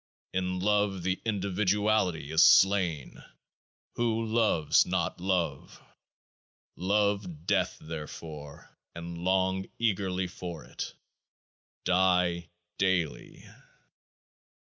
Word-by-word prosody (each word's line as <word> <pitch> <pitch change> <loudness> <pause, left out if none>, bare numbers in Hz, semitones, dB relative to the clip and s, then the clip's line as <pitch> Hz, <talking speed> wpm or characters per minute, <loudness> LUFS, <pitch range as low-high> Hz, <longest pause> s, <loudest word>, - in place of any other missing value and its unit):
In 90 0 -1
love 100 -1 +1
the 95 +1 -1
individuality 100 -5 0
is 80 +1 +4
slain; 95 -7 +4 0.7
who 115 -1 0
loves 110 -9 +3
not - - -2
love? 90 -7 -2 1.0
Love 100 -4 0
death - - +1
therefore, 75 -2 -9 0.2
and 85 0 -7
long 95 +1 +1
eagerly 95 -5 0
for 90 -2 -7
it. - - -7 0.9
Die 90 -2 +2 0.3
Daily. 95 -5 -1
95 Hz, 80 wpm, -29 LUFS, 85-100 Hz, 1.0 s, is